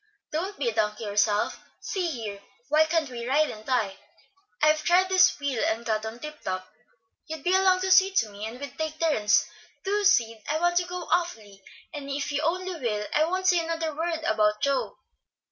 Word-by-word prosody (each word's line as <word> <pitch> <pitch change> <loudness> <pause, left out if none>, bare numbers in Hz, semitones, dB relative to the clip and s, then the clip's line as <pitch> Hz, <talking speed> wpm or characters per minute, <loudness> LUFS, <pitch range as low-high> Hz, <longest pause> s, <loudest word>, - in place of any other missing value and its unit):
"Don't 370 +6 -3
be 270 - -1
a 230 - +1
donkey 210 0 -1
yourself. 205 0 +1 0.2
See 370 -3 -2
here, 215 -8 -6 0.3
why 305 +2 +5
can't 320 -1 0
we 235 -1 -6
ride 300 +4 +2
and 215 - -10
tie? 220 -6 0 0.6
I've 305 0 +3
tried 365 +2 +4
this 370 -5 +4
wheel, 280 -5 -1
and 225 +1 -1
got 220 -1 -1
on 220 +1 -7
tip 300 +3 -9
top. 185 0 -4 0.6
You'd 315 -2 -6
be 360 - +2
along 375 -1 +4
to 380 0 0
see 380 +1 +7
to 225 - +2
me, 205 +1 -6
and 235 +3 -9
we'd 280 -3 -7
take 315 0 -3
turns. 210 -11 +3 0.4
Do, 410 +2 0
Sid! 230 - +3
I 305 - +1
want 350 +1 +1
to 355 - +2
go 360 0 -5
awfully, 220 - -1 0.3
and 285 -2 -6
if 280 +1 -2
you 290 0 0
only 365 +1 -2
will 210 -5 -2
I 305 +1 +4
won't 370 +3 -2
say 360 -2 +5
another 325 -2 -3
word 325 0 -2
about 210 -2 +2
Joe." 280 +2 0
295 Hz, 200 wpm, -26 LUFS, 220-345 Hz, 0.6 s, see